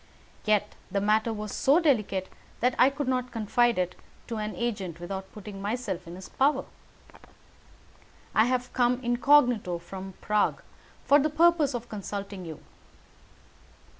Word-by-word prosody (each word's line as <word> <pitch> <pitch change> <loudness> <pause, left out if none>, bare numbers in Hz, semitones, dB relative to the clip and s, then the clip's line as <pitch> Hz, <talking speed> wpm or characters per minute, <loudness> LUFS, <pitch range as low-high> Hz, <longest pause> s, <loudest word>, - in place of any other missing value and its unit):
Yet 215 -1 +2 0.2
the 200 +1 0
matter 215 +3 +2
was 210 -1 -5
so 280 +5 +4
delicate 210 - +1 0.3
that 250 +1 +2
I 255 - +7
could 280 0 -4
not 250 -1 -1
confide 235 +1 +2
it 180 0 0 0.4
to 230 - -3
an 215 0 -3
agent 200 -8 -3
without 190 +2 -6
putting 205 -1 -9
myself 200 -4 -3
in 170 - -8
his 185 +1 -9
power. 270 0 +1 1.7
I 220 - +5
have 250 0 -1
come 245 0 +2
incognito 240 -6 +3
from 190 +2 -9
Prague 210 -1 +1 0.4
for 285 - +6
the 300 +2 +1
purpose 315 -3 +3
of 240 0 -5
consulting 200 -2 -6
you." 160 -2 -8
220 Hz, 140 wpm, -27 LUFS, 195-250 Hz, 1.7 s, I